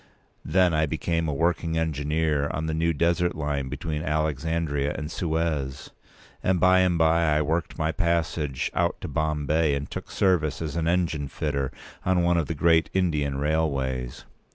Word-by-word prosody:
Then 90 -2 +3
I 75 0 +2
became 80 +2 -1
a 75 - -1
working 80 +1 0
engineer 75 -1 0
on 80 - -3
the 80 - -2
new 80 +1 +1
desert 85 +3 +1
line 75 -3 -2
between 75 +2 -3
Alexandria 75 -1 -1
and 75 +1 -5
Suez; 80 -6 -2 0.5
and 95 -1 +1
by 95 +1 +5
and 90 -2 +3
by 80 -1 +3
I 75 - +2
worked 80 +3 -2
my 80 -1 0
passage 80 -6 -1
out - - 0
to - - -4
Bombay, 75 -1 +1
and 70 +1 -5
took - - -6
service 80 -7 +1
as 80 -2 -4
an 85 -1 -1
engine 85 -4 0
fitter 70 -2 -2 0.3
on 90 -1 +2
one 85 0 +3
of 80 - 0
the 80 - -3
great 80 +2 +3
Indian 75 -7 +1
railways. 70 -5 -1
80 Hz, 165 wpm, -26 LUFS, 75-85 Hz, 0.5 s, by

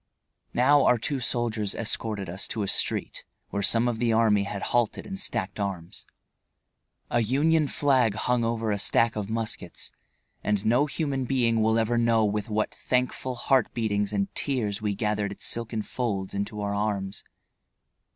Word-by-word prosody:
Now, 140 +3 +5
our 125 - +5
two 135 +4 -2
soldiers 115 -4 -1
escorted 110 -3 -2
us 90 +4 -2
to 110 - -2
a - - -2
street - - 0 0.3
where 100 - -1
some 115 +4 +3
of 120 -2 -1
the 120 -1 +2
army 110 -3 +3
had 100 0 -5
halted 120 -3 +1
and 195 -1 -6
stacked 100 - -1
arms. 95 -4 -5 1.0
A 120 - +3
Union 150 +7 +2
flag 130 -7 +2
hung 125 +2 0
over 115 -1 -1
a 100 - -1
stack 115 +3 +3
of 105 -1 -3
muskets, 110 -5 -4 0.5
and 105 0 0
no 125 +7 +3
human 140 -3 -2
being 120 -3 +2
will 110 +1 +3
ever 115 +1 +1
know 115 -2 +3
with 105 +2 -2
what 110 0 -1
thankful 125 0 -1
heart 130 -1 +2
beatings 105 -3 0
and 100 -1 -1
tears 110 -8 -1
we 105 -2 -1
gathered 105 -1 -1
its 100 - -3
silken 115 -2 -2
folds 100 -7 -3
into 100 +1 -3
our 100 0 -2
arms. 100 -1 -2
110 Hz, 165 wpm, -26 LUFS, 105-120 Hz, 1.0 s, Now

